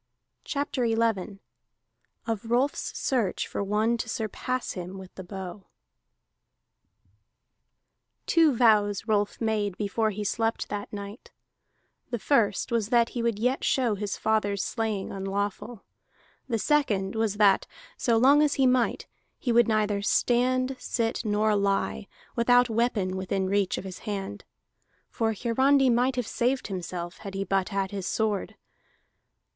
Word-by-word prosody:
CHAPTER 285 -3 -2
XI 225 -3 0 0.9
OF 225 -1 -3
ROLF'S 255 +4 0
SEARCH 235 -9 0
FOR - - -3
ONE 215 +4 +1
TO 225 - -4
SURPASS 245 +4 -3
HIM 180 +1 -6
WITH 190 -1 -11
THE 190 - -8
BOW 190 +1 -8 2.6
Two 320 -5 +4
vows 210 -4 +3
Rolf 205 -2 0
made 210 -4 -1
before 215 +2 0
he 210 0 -4
slept 225 +2 -1
that 205 0 -5
night: 205 +3 -8 0.8
the 240 - -2
first 225 -2 +1
was 225 -3 0
that 235 -2 +3
he 240 - -4
would 230 -3 0
yet 250 +5 0
show 250 -5 +2
his 205 -1 -3
father's 205 -3 0
slaying 220 -4 -2
unlawful; 200 +3 -4 0.7
the 230 - +1
second 215 -8 +1
was 220 -2 0
that, 205 -2 +4 0.3
so 235 -2 +1
long 275 +5 +6
as 300 -1 +2
he 270 - +3
might, 250 -2 +2 0.3
he 245 - -1
would 235 +1 +5
neither 210 -2 +1
stand, 255 +4 +2
sit, 230 -2 -2
nor 210 0 +2
lie, 200 0 0 0.3
without 245 0 +4
weapon 220 -5 0
within 190 0 -1
reach 200 -1 +1
of - - -5
his 190 -1 -8
hand. 195 - -5 0.7
For 225 -1 0
Hiarandi 260 +4 +3
might 250 +2 +2
have 250 -2 -1
saved 250 +2 -1
himself 175 -2 -5
had 195 -1 -8
he 195 - -1
but 195 -1 0
had 195 -2 -2
his 195 -2 -4
sword. 215 -3 -1
220 Hz, 140 wpm, -27 LUFS, 200-240 Hz, 2.6 s, long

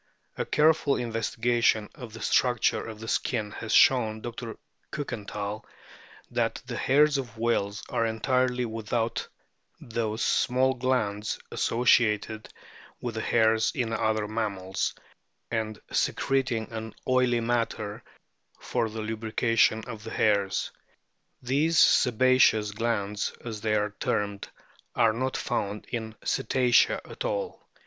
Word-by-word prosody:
A - - -2
careful 150 -2 +3
investigation 115 -1 +1
of 120 -4 -10
the 115 - -9
struc 125 -2 +2
ture - - +1
of 110 -1 -8
the 115 - -8
skin 110 -3 -1
has 110 +1 -6
shown 110 -4 +4
Dr. 115 -1 -6 0.3
Kukenthal 105 -6 -5 0.7
that - - 0
the - - -5
hairs 145 +1 +3
of 120 -4 -7
whales 105 -3 0
are 115 - 0
entirely 125 +2 +1
without 115 0 -2 0.5
those 110 -1 -2
small 130 +1 +2
glands 115 -5 -1
associated 110 -2 +2 0.5
with 120 -2 -4
the 110 - -3
hairs 110 -1 +3
in 115 -3 -1
other 110 -2 0
mammals, 100 -4 -2 0.6
and 110 -2 -2
secreting 130 -5 0
an 110 -1 -6
oily 125 -2 +3
matter 115 -3 -2 0.6
for 115 -1 -1
the 110 +1 -5
lubrication 110 0 +1
of 115 -3 -8
the 115 - -7
hairs; 100 -4 +1 0.7
these 145 +6 +1
sebaceous 125 -5 +4
glands, 105 -2 -2
as 110 -3 -5
they 110 0 +1
are 105 0 0
termed, 100 -1 -2 0.5
are 110 -1 +4
not 130 +3 -2
found 105 0 -3
in 110 -2 -4
Cetacea 125 -2 +3
at - - -7
all. - - -4
115 Hz, 125 wpm, -27 LUFS, 110-125 Hz, 0.7 s, shown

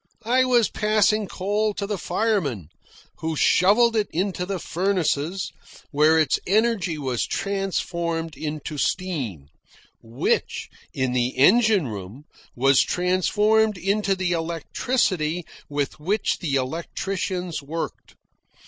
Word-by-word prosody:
I 255 +3 +3
was 240 -3 +4
passing 215 0 +2
coal 205 +3 -1
to 200 - -3
the 200 -2 -3
firemen, 155 - -1 0.5
who 160 0 -3
shovelled 215 +9 +4
it 210 -2 +1
into 180 +1 -2
the 195 -1 -2
furnaces, 180 -1 -1 0.4
where 155 +2 +4
its 155 -2 +2
energy 205 -5 +1
was 130 -5 -1
transformed 170 -5 -2
into 150 0 -5
steam, 130 - -2 0.5
which, 115 +3 -2 0.2
in 130 -1 -1
the 125 +1 0
engine 205 - +5
room, 105 +5 -8 0.3
was 135 +2 +4
transformed 210 +4 +2
into 195 +2 0
the 185 -1 -1
electricity 170 - -1 0.2
with 145 0 -2
which 195 +7 0
the 150 -6 -1
electricians 170 +5 -3
worked. 160 +4 -6
180 Hz, 110 wpm, -24 LUFS, 150-205 Hz, 0.5 s, engine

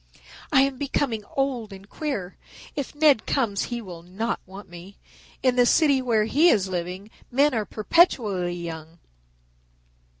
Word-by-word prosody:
"I 265 - +6
am 275 -2 -2
becoming 270 -6 -1
old 255 -6 -1
and 195 0 -12
queer. 205 - -4 0.4
If 285 -1 -5
Ned 295 -6 +4
comes 220 -7 0
he 240 -1 -5
will 175 -4 -9
not 195 +7 -3
want 190 +1 -11
me. 175 +3 -12 0.5
In 255 -1 +2
the 245 - +5
city 280 -3 +4
where 225 -4 +1
he 305 +9 +4
is 195 - +2
living 185 +3 -5 0.2
men 280 +3 +3
are 220 -3 -1
perpetually 210 - +2
young. 165 -1 -8
220 Hz, 145 wpm, -24 LUFS, 185-270 Hz, 0.5 s, I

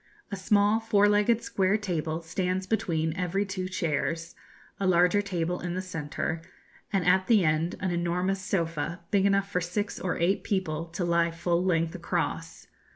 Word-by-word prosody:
A - - -2
small 205 +2 +3
four 210 -2 +3
legged 210 +3 +3
square 195 +2 +1
table 170 -5 -3
stands 185 +3 -1
between 160 -6 0
every 185 +2 -1
two 190 -1 -4
chairs, 165 -1 -2 0.5
a 195 - 0
larger 180 +2 +4
table 180 -3 -2
in 175 0 -4
the 185 - -1
centre, 160 -2 -3 0.5
and 195 -4 +1
at 185 +1 +4
the 215 -7 +5
end 155 +2 +1
an 185 -1 -1
enormous 180 +3 0
sofa, 165 -3 -2
big 200 -1 +4
enough 200 0 +1
for 180 - 0
six 205 +5 -3
or 180 -3 -2
eight 180 +4 +1
people 165 -5 -1
to 170 +2 -4
lie 170 0 +2
full 170 +1 0
length 165 -3 +1
across. - - -3
180 Hz, 165 wpm, -28 LUFS, 170-195 Hz, 0.5 s, the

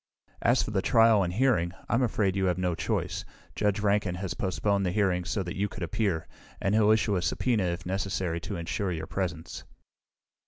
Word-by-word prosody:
"As 120 +2 +3
for - - -4
the 95 -2 +1
trial 115 -1 +5
and 90 -2 0
hearing, 95 -6 +2
I'm 115 - +2
afraid 105 -6 +1
you 95 -1 +1
have 90 -1 +1
no 90 -1 0
choice. 80 - -2 0.3
Judge 105 0 +1
Rankin 100 -3 +1
has 95 -1 -3
postponed 100 +2 0
the 90 - 0
hearing 90 -3 +1
so 90 +4 -1
that 85 - -5
you 100 +2 0
could 100 - -6
appear, 85 -3 -1 0.3
and 95 - 0
he'll 105 -1 +4
issue 110 -2 +3
a - - 0
subpoena 110 0 +1
if 85 -1 -3
necessary 95 -2 -2
to 100 - -5
insure 90 +3 -2
your 80 -2 -3
presence." 85 -4 -4
95 Hz, 195 wpm, -28 LUFS, 90-105 Hz, 0.3 s, trial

